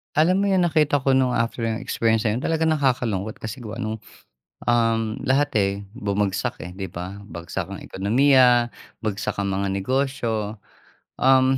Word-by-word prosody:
Alam 180 Hz, +6 st, +4 dB
mo -, -, +2 dB
'yun, 190 Hz, -, +3 dB
nakita 150 Hz, -3 st, +2 dB
ko 135 Hz, 0 st, +2 dB
no'ng 130 Hz, -1 st, +3 dB
after 115 Hz, 0 st, -1 dB
ng 115 Hz, 0 st, -1 dB
experience 115 Hz, 0 st, +1 dB
na 110 Hz, -, +1 dB
'yun 125 Hz, -, -4 dB
talagang 160 Hz, 0 st, +1 dB
nakakalungkot 115 Hz, -7 st, -1 dB
kasi 110 Hz, +3 st, -6 dB
gawa 110 Hz, +2 st, -6 dB
no'ng, 110 Hz, -1 st, -2 dB, 0.8 s
um, 115 Hz, -2 st, +1 dB
lahat, 140 Hz, +2 st, +3 dB
eh, 100 Hz, -1 st, +2 dB, 0.3 s
bumagsak, 100 Hz, -5 st, -1 dB
eh, 90 Hz, -, -6 dB
'di 95 Hz, +1 st, -5 dB
ba? 90 Hz, +3 st, -7 dB
Bagsak 85 Hz, -3 st, -5 dB
ang -, -, -8 dB
ekonomiya, 120 Hz, +3 st, +4 dB, 0.3 s
bagsak 105 Hz, -1 st, -2 dB
ang 100 Hz, -, -1 dB
mga 100 Hz, +1 st, -1 dB
negosyo, 110 Hz, -2 st, -1 dB, 0.6 s
um, 130 Hz, 0 st, +4 dB
115 Hz, 160 wpm, -23 LUFS, 100-130 Hz, 0.8 s, Alam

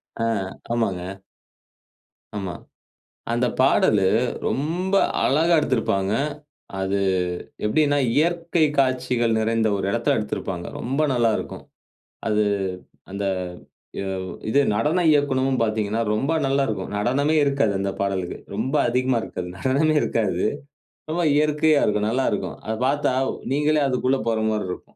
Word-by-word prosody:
ஆ. 115 Hz, -, -2 dB, 0.5 s
ஆமாங்க. 95 Hz, -4 st, -2 dB, 1.2 s
ஆமா. 95 Hz, -4 st, -4 dB, 0.8 s
அந்த 120 Hz, +1 st, +1 dB
பாடலு 110 Hz, -6 st, +4 dB, 0.4 s
ரொம்ப 175 Hz, +7 st, -1 dB, 0.3 s
அழகா 160 Hz, +5 st, +3 dB
எடுத்திருப்பாங்க. 105 Hz, -8 st, 0 dB, 0.7 s
அது 95 Hz, +1 st, 0 dB, 0.6 s
எப்படின்னா, 145 Hz, +6 st, +2 dB, 0.2 s
இயற்கை 170 Hz, +1 st, +2 dB
காட்சிகள் 125 Hz, -3 st, +1 dB
நிறைந்த 110 Hz, 0 st, +1 dB
ஒரு 95 Hz, -, -3 dB
இடத்தில 115 Hz, +3 st, +1 dB
எடுத்திருப்பாங்க. 95 Hz, -4 st, -4 dB
ரொம்ப 135 Hz, +5 st, -2 dB
நல்லா 120 Hz, -2 st, +3 dB
இருக்கும். -, -, -7 dB, 0.6 s
அது 105 Hz, 0 st, +2 dB, 0.7 s
அந்த 100 Hz, +1 st, -3 dB, 0.7 s
வ் 95 Hz, -1 st, -4 dB, 0.2 s
இது 140 Hz, +6 st, +3 dB
நடன 150 Hz, -, +1 dB
இயக்கணும்ன்னு 135 Hz, -3 st, +2 dB
பார்த்தீங்கன்னா, 110 Hz, 0 st, 0 dB
ரொம்ப 135 Hz, +9 st, 0 dB
நல்லா 135 Hz, +1 st, +2 dB
இருக்கும். 100 Hz, -5 st, -4 dB
நடனமே 140 Hz, +9 st, +1 dB
இருக்காது 140 Hz, -6 st, +1 dB
அந்த 100 Hz, 0 st, -1 dB
பாடலுக்கு 95 Hz, -2 st, -2 dB, 0.2 s
ரொம்ப 120 Hz, +7 st, -2 dB
அதிகமா 125 Hz, 0 st, +1 dB
இருக்காது. 90 Hz, -4 st, -5 dB
நடனமே 140 Hz, +7 st, +2 dB
இருக்காது. 95 Hz, -6 st, 0 dB, 0.7 s
ரொம்ப 170 Hz, +2 st, 0 dB
இயற்கையா 150 Hz, 0 st, +3 dB
இருக்கும். 105 Hz, 0 st, +1 dB
நல்லா 130 Hz, +3 st, 0 dB
இருக்கும். -, -, -3 dB
அதை 110 Hz, -, -2 dB
பார்த்தா 140 Hz, +1 st, +1 dB, 0.4 s
நீங்களே 150 Hz, +2 st, +2 dB
அதுக்குள்ளே 130 Hz, +1 st, +1 dB
போற 115 Hz, -1 st, +1 dB
மாரி 110 Hz, -2 st, -1 dB
இருக்கும். -, -, -10 dB
120 Hz, 120 wpm, -23 LUFS, 105-145 Hz, 1.2 s, பாடலு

